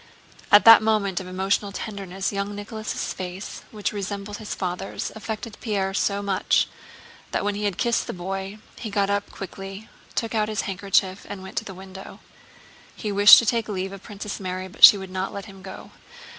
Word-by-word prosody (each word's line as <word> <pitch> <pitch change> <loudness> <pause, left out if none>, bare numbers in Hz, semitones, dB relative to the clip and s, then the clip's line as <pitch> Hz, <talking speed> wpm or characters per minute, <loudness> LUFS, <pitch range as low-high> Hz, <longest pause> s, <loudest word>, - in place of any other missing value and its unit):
At 205 - +8
that 225 -1 +10
moment 210 -4 +1
of 185 - -8
emotional 195 +2 0
tenderness 195 -2 -4
young 200 +1 -3
Nicholas' 215 +1 -4
face, 185 +2 -7
which 210 -1 -3
resembled 205 0 -5
his 215 -2 -6
father's, 180 +1 -4
affected 220 0 -6
Pierre 195 -4 -1
so 200 +1 0
much 195 -2 +2 0.6
that - - -1
when 205 0 0
he 205 +1 -3
had 200 -3 -1
kissed 235 0 +1
the - - -3
boy 195 +3 -5 0.2
he 225 - -5
got 200 -1 +1
up 205 0 -1
quickly, 195 +2 -8 0.3
took 230 -1 -2
out 215 -1 +1
his 215 - -1
handkerchief, 195 0 0
and 195 -2 -7
went 190 - -10
to - - -1
the 190 - -8
window. 190 +1 -11 0.8
He 210 - -4
wished 205 +1 +10
to 235 - +3
take 230 0 0
leave 190 -1 -3
of 195 - -9
Princess 205 +1 -7
Mary, 185 -1 -4
but 185 - -9
she 205 - +12
would 190 -1 -8
not 190 +1 -3
let 200 - -6
him 195 -3 -13
go. 190 0 -10
200 Hz, 190 wpm, -24 LUFS, 190-210 Hz, 0.8 s, she